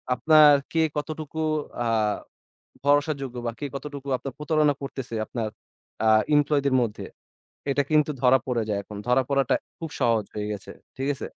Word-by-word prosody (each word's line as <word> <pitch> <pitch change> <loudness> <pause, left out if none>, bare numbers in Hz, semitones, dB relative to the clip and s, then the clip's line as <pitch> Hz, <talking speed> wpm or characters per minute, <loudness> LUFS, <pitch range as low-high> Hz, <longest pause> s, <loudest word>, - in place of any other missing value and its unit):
আপনার 155 +3 +7 0.2
কে 165 - +2 0.2
কতটুকু 155 +1 -5 0.5
আ - - +1 1.0
ভরসাযোগ্য 145 -3 +1
বা - - +1
কে 145 - -2
কতটুকু 140 -1 -7
আপনার 135 +1 -7
প্রতারণা 150 -1 +2
করতেছে 135 -3 -6
আপনার 115 -3 -3 0.6
আ - - +5 0.3
এমপ্লয়িদের 145 -2 +2
মধ্যে 110 -3 -3 0.7
এটা 145 +1 +2
কিন্তু 155 -1 +3
ধরা 130 +1 +6
পড়ে 120 -3 0
যায় 105 -1 0
এখন। 105 +1 -10
ধরা 125 +2 +4
পড়াটা 140 -2 +2 0.2
খুব 165 -3 -6
সহজ 115 -4 +2
হয়ে 105 -1 -3
গেছে। 100 -2 -8 0.3
ঠিক 135 +1 -2
আছে? 135 - -6
140 Hz, 155 wpm, -25 LUFS, 125-150 Hz, 1.0 s, আপনার